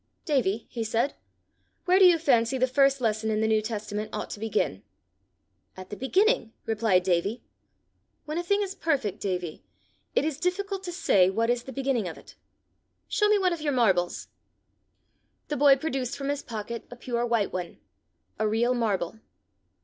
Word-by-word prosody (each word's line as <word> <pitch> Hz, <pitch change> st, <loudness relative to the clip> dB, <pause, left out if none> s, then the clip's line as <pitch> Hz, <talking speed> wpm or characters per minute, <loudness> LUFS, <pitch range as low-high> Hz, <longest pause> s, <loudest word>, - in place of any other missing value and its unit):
"Davie," 230 Hz, -, 0 dB
he 235 Hz, -3 st, -3 dB
said, 230 Hz, +5 st, 0 dB, 0.7 s
"where 370 Hz, +1 st, +4 dB
do 385 Hz, -, +8 dB
you 350 Hz, -2 st, +7 dB
fancy 265 Hz, -5 st, +2 dB
the 255 Hz, -, +3 dB
first 275 Hz, +1 st, +3 dB
lesson 220 Hz, -1 st, 0 dB
in 215 Hz, -1 st, 0 dB
the 220 Hz, -, +2 dB
New 220 Hz, -1 st, +3 dB
Testament 215 Hz, -1 st, -4 dB
ought 215 Hz, -, -5 dB
to -, -, -6 dB
begin?" 220 Hz, 0 st, -1 dB, 1.0 s
"At 185 Hz, +1 st, -10 dB
the -, -, -4 dB
beginning," 315 Hz, -, +1 dB
replied 215 Hz, -5 st, +2 dB
Davie. 185 Hz, +5 st, 0 dB, 0.8 s
"When 305 Hz, +3 st, -3 dB
a -, -, -2 dB
thing 400 Hz, +3 st, +1 dB
is 385 Hz, -1 st, -4 dB
perfect, 270 Hz, -, -1 dB
Davie, 180 Hz, -4 st, -3 dB, 0.5 s
it -, -, +3 dB
is 305 Hz, -2 st, -2 dB
difficult 385 Hz, +2 st, -1 dB
to 350 Hz, -, -4 dB
say 195 Hz, -, +3 dB
what 230 Hz, +4 st, +1 dB
is 245 Hz, 0 st, 0 dB
the 265 Hz, -, -7 dB
beginning 265 Hz, -5 st, -1 dB
of 165 Hz, -, -7 dB
it: -, -, -15 dB, 0.7 s
show 420 Hz, -, +2 dB
me 425 Hz, -, +5 dB
one 370 Hz, -3 st, +2 dB
of 335 Hz, -, -5 dB
your 295 Hz, -2 st, 0 dB
marbles." 190 Hz, -8 st, +1 dB, 1.2 s
The 295 Hz, -, -1 dB
boy 280 Hz, 0 st, +7 dB
produced 270 Hz, -3 st, -3 dB
from 275 Hz, 0 st, -3 dB
his 285 Hz, 0 st, -1 dB
pocket 230 Hz, 0 st, -6 dB
a 245 Hz, -, -9 dB
pure 240 Hz, -1 st, -2 dB
white 230 Hz, -4 st, 0 dB
one 180 Hz, -2 st, -5 dB, 0.6 s
a 215 Hz, -, +2 dB
real 230 Hz, +3 st, +2 dB
marble. 220 Hz, -5 st, -1 dB
235 Hz, 175 wpm, -27 LUFS, 215-290 Hz, 1.2 s, do